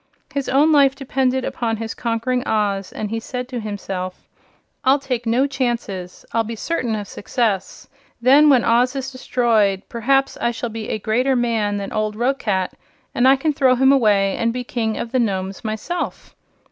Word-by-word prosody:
His 280 -1 -2
own 290 +4 +4
life 280 -3 +5
depended 260 -1 0
upon 225 -2 -2
his 225 0 -4
conquering 240 +2 -1
Oz, 200 -3 0
and 210 -1 -5
he 225 - -1
said 250 +2 -5
to 250 -2 -4
himself: 195 -4 -5 0.6
"I'll 265 +2 +5
take 250 -4 -3
no 245 +4 +3
chances. 235 -9 -3
I'll 230 - +2
be 230 +1 -5
certain 240 -3 -2
of 205 -1 -5
success. 205 -3 -2 0.3
Then, 275 +5 +6
when 260 -4 +5
Oz 245 +3 +3
is 270 0 -4
destroyed, 225 -6 +1
perhaps 270 +4 +1
I 235 - +2
shall 240 0 -4
be 220 -1 -6
a - - -1
greater 245 +5 +1
man 225 -4 0
than 200 -1 -5
old 215 -1 -1
Roquat, 220 -6 0 0.4
and 245 +2 +3
I 270 - +7
can 300 +3 0
throw 260 -2 +3
him 265 +2 +4
away 205 -7 +3
and 230 0 +1
be 250 +1 -4
King 225 -3 -2
of 230 - -4
the 255 - +1
Nomes 195 -4 -2
myself. 220 +11 -4
235 Hz, 180 wpm, -21 LUFS, 215-260 Hz, 0.6 s, I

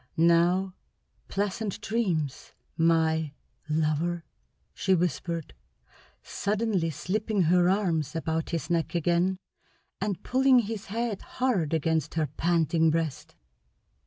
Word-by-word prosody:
Now, 170 +3 +3 0.5
pleasant 200 +1 -2
dreams, 170 - -2 0.2
my 160 -2 +2 0.4
lover!" 160 +2 0 0.5
she 190 -1 +2
whispered, 170 -2 -2 0.7
suddenly 205 -5 -1
slipping 205 - -1
her 175 +2 +4
arms 165 -7 0
about 160 0 -2
his 165 0 -3
neck 170 +1 0
again 175 +3 +2 0.6
and 200 -2 -2
pulling 260 0 +4
his 220 -1 -5
head 225 0 -2 0.2
hard 230 - +1
against 160 -1 0
her 160 -2 +2
panting 165 +2 +2
breast. 160 -3 -2
170 Hz, 100 wpm, -27 LUFS, 160-195 Hz, 0.7 s, her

